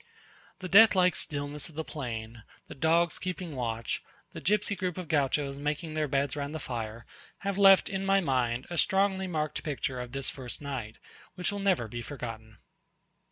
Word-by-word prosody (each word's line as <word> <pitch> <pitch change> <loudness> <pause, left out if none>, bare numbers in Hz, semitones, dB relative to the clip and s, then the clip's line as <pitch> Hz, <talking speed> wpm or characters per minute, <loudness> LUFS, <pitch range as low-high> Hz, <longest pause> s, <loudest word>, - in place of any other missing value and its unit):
The 185 - -4
death 210 +3 +8
like 180 -1 +4
stillness 145 0 -2
of 160 - -16
the 160 - -2
plain, 115 -6 -6 0.3
the - - -8
dogs 165 +3 +2
keeping 180 -4 -4
watch, 115 -3 -2 0.3
the - - -7
gipsy 205 +1 +2
group 185 -3 -3
of 180 -3 -5
Gauchos 140 -1 +1
making 150 +2 -2
their 155 -1 0
beds 140 0 0
round 145 +1 -4
the - - -3
fire, 115 -4 -5 0.4
have 200 0 -2
left 195 -1 +7
in 195 0 -2
my 195 0 +4
mind 130 -6 0
a 170 - 0
strongly 190 -1 +2
marked 155 -3 -2
picture 140 -4 -3
of 125 -1 -7
this 135 -1 -1
first 125 -3 -7
night, 130 -7 -5 0.4
which 180 +1 -1
will 205 - -4
never 190 - +2
be 120 +2 -5
forgotten. 115 -4 -7
150 Hz, 180 wpm, -29 LUFS, 125-180 Hz, 0.4 s, death